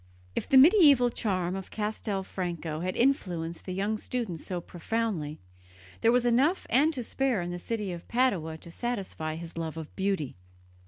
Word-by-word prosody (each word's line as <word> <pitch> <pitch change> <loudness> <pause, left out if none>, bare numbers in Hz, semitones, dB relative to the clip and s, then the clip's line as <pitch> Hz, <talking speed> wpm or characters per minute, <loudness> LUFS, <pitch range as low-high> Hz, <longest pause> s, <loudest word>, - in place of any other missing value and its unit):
If - - -2
the 270 - +6
medieval 285 - +7
charm 185 -6 -1
of 190 -1 -6
Castelfranco 190 -6 -3
had 185 +2 -2
influenced 175 - 0
the 185 - -4
young 200 +4 -1
student 225 -11 -3
so 180 +3 -4
profoundly, 175 -3 -3 0.6
there 230 - +5
was 245 0 +3
enough 265 +10 +3
and 285 +6 +5
to 250 - -3
spare 260 -2 0
in 175 0 -3
the 175 - -4
city 210 0 -3
of 170 -1 -8
Padua 195 -11 +1
to 170 - -12
satisfy 190 -8 -3
his 165 0 -7
love 160 -1 -4
of 160 -2 -8
beauty. 190 - -1
195 Hz, 165 wpm, -29 LUFS, 170-240 Hz, 0.6 s, medieval